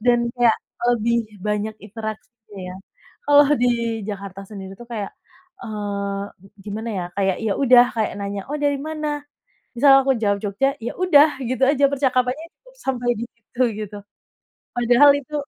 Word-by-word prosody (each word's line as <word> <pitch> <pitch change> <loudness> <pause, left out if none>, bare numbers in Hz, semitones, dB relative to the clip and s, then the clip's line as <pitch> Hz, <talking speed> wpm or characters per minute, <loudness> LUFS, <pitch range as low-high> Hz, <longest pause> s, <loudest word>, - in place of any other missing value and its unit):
dan 240 0 +2
kayak 240 -3 +3 0.3
lebih 235 -1 +1 0.2
banyak 210 +1 -1
interaksinya 220 0 -9
ya. - - -9 0.5
Kalau 290 0 +7
di 245 0 +2 0.4
Jakarta 195 -2 -6
sendiri 195 -3 -8
tuh 240 - -11
kayak, 215 -4 -5 0.5
eee, 200 - -4 0.2
gi 195 - -17 0.2
gimana 215 +2 -5
ya, 185 -3 -2
kayak 195 -2 +1
ya 215 - +1
udah, 250 -3 +7
kayak 220 -1 0
nanya, 200 0 -3
"Oh, 295 - -2
dari 290 -1 +1
mana?" 305 -1 -3 0.5
Misal 270 +2 +6
aku 270 0 +2
jawab 205 -2 +1
Jogja, 245 +7 0
ya 235 - -3
udah, 305 -5 +5
gitu 255 +2 -2
aja 280 0 +4
percakapannya, 265 +2 0 0.2
cukup - - -20
sampai 250 - -2
di 230 - -3
situ 235 +2 -5 0.2
gitu. 210 -1 -6 0.8
Padahal 245 +4 +5
itu, 285 +1 -10
235 Hz, 155 wpm, -22 LUFS, 210-270 Hz, 0.8 s, Kalau